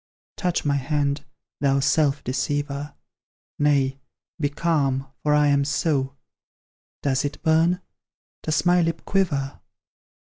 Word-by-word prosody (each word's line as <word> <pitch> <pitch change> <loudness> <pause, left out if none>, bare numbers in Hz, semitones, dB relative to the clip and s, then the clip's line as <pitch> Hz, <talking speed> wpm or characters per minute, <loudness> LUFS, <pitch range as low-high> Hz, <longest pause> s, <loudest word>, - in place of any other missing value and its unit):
Touch 180 -4 -1
my 140 -1 +2
hand, 140 +1 -1 0.3
thou 140 -1 +2
self 140 +1 +2
deceiver; 140 +3 -2 0.6
Nay 140 -2 +2 0.4
be 145 -2 +1
calm, 145 -4 0 0.2
for 150 0 +3
I 150 0 +4
am 140 0 +3
so: 140 -1 0 0.9
Does 135 -2 +1
it 145 0 -3
burn? 165 +3 +3 0.6
Does 155 +2 0
my 175 0 +5
lip 165 -1 -1
quiver? 150 -9 0
145 Hz, 115 wpm, -24 LUFS, 140-160 Hz, 0.9 s, my